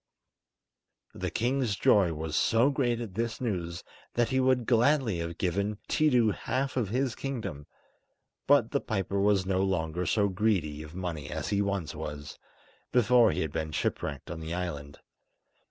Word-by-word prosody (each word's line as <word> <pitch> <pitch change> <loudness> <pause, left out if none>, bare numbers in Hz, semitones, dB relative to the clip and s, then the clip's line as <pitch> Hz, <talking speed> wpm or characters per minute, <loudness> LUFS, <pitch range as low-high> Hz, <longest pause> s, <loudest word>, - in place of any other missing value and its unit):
The - - -3
king's 125 -2 0
joy 95 -3 +4
was 80 0 -4
so 115 - +3
great 120 -4 0
at 110 -5 -6
this 115 +2 -2
news 85 -8 -3 0.3
that 120 -1 +2
he 130 - +1
would 130 -2 +2
gladly 120 - +3
have 85 0 -4
given 100 +3 -1
Tiidu 125 -8 +3
half 130 +5 -2
of 120 -7 0
his 130 +2 0
kingdom; 110 - -5 0.8
but 140 -5 +4
the 140 - 0
piper 100 -2 -2
was 100 -2 +3
no 95 0 +1
longer 90 -2 -1
so 105 +2 +2
greedy 95 -7 0
of 75 +2 -10
money 85 -5 -4
as 80 +2 -4
he 100 0 +1
once 100 -6 -2
was, 75 -2 -7 0.5
before 125 0 +5
he 75 - -2
had 80 - -2
been 80 0 -3
shipwrecked 70 -2 -3
on 85 - -5
the 80 +1 -4
island. 75 -6 -5
100 Hz, 160 wpm, -29 LUFS, 80-120 Hz, 0.8 s, before